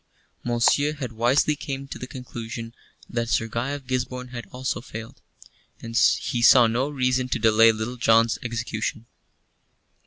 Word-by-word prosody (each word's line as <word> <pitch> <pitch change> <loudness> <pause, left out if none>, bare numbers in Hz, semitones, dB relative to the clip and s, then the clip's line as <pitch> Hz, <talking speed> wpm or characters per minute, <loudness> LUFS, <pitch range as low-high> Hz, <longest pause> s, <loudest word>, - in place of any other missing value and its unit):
Monceux 120 +5 +2
had 130 -5 -5
wisely 125 +7 +2
come 140 -2 -6
to - - -8
the 125 - -6
conclusion 115 -3 -7 0.3
that 120 -1 -3
Sir 115 -1 +1
Guy 115 +4 -3
of 140 -1 -5
Gisborne 125 0 -3
had 120 -2 -8
also 130 0 -4
failed, 115 -2 -9 0.6
and 115 0 -8
he 120 +1 +2
saw 120 +1 +7
no 120 +5 0
reason 130 -2 0
to - - 0
delay 115 0 +5
Little 110 +3 -5
John's 115 -1 +3
execution. 115 -1 -4
120 Hz, 150 wpm, -24 LUFS, 115-130 Hz, 0.6 s, saw